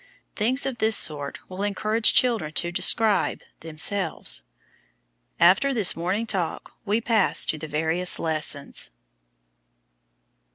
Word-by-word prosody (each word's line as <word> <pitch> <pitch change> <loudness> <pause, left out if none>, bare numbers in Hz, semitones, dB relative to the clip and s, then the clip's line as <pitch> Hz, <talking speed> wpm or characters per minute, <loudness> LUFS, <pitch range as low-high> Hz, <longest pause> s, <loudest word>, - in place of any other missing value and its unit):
Things 250 +6 0
of 260 -4 -4
this 220 0 +4
sort 145 -2 +1
will 185 +1 -8
encourage 215 +2 +2
children 225 -12 +2
to 175 +1 -1
describe, 200 +4 0 0.2
themselves. 165 +5 0 1.0
After 190 +11 +3
this 210 -6 +4
morning 185 +7 -2
talk 190 -7 -4
we 210 +2 0
pass 230 -1 +1
to 155 - -3
the 155 - -7
various 160 +4 -1
lessons. 155 - -2
190 Hz, 115 wpm, -23 LUFS, 160-220 Hz, 1.0 s, this